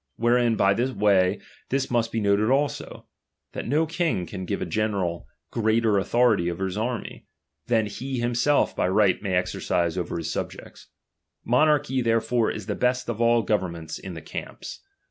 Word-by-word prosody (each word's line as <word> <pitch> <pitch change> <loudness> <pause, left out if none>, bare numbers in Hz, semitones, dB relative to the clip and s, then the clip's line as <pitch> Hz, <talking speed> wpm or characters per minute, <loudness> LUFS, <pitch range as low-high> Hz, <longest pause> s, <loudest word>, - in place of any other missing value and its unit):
Wherein, 120 0 +2
by 100 -2 +3
tl»e 125 +5 -1
way, 100 -2 +3 0.3
this 135 -1 -1
must 115 -2 +1
be 115 - -1
noted 105 +1 +2
also; 140 +2 -1 0.5
that - - -5
no 150 +6 +2
king 165 - -1
can 95 0 -7
Sive - - -2
a - - -3
general 100 -6 -2 0.2
greater 110 -2 +2
authority 110 -4 +2
over 90 +2 -3
his 95 -1 -4
army, 115 +2 -4 0.4
ttian 115 -2 +3
he 130 +6 -5
himself 120 +4 +1
by - - +1
right 95 0 +3
may 95 -3 -1
exercise 90 -1 0
over 90 - -4
all - - -1
his 80 -1 -4
^Xibjects. - - -6 0.6
Monarch]) 145 +4 +3 0.2
therefore 115 0 +1
is 105 - -5
the - - -2
best 125 0 0
of 115 0 -3
all 115 -1 +3
^■overnments 85 -7 -2
in 95 -2 -8
the 80 - -8
camps. - - -7
110 Hz, 170 wpm, -25 LUFS, 95-120 Hz, 0.6 s, by